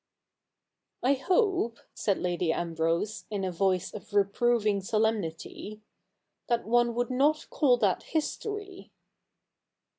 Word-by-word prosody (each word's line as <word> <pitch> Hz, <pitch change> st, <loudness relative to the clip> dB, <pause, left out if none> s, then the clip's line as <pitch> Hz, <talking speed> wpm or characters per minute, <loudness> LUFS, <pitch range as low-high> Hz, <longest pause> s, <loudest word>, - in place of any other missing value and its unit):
' -, -, -39 dB
I 265 Hz, +3 st, +4 dB
hope,' 355 Hz, -, +1 dB, 0.2 s
said 200 Hz, -3 st, 0 dB
Lady 175 Hz, -2 st, 0 dB
Ambrose, 170 Hz, +6 st, -1 dB
in 205 Hz, -2 st, -3 dB
a 185 Hz, -, -1 dB
voice 185 Hz, 0 st, 0 dB
of 205 Hz, 0 st, -9 dB
reproving 210 Hz, +1 st, +2 dB
solemnity, 215 Hz, 0 st, -2 dB, 0.6 s
'that 235 Hz, -1 st, 0 dB
one 240 Hz, +1 st, +2 dB
would 245 Hz, +1 st, -1 dB
not 295 Hz, +4 st, +2 dB
call 260 Hz, -5 st, +4 dB
that 200 Hz, -6 st, +1 dB
history.' 395 Hz, +4 st, -4 dB
220 Hz, 115 wpm, -29 LUFS, 190-255 Hz, 0.6 s, I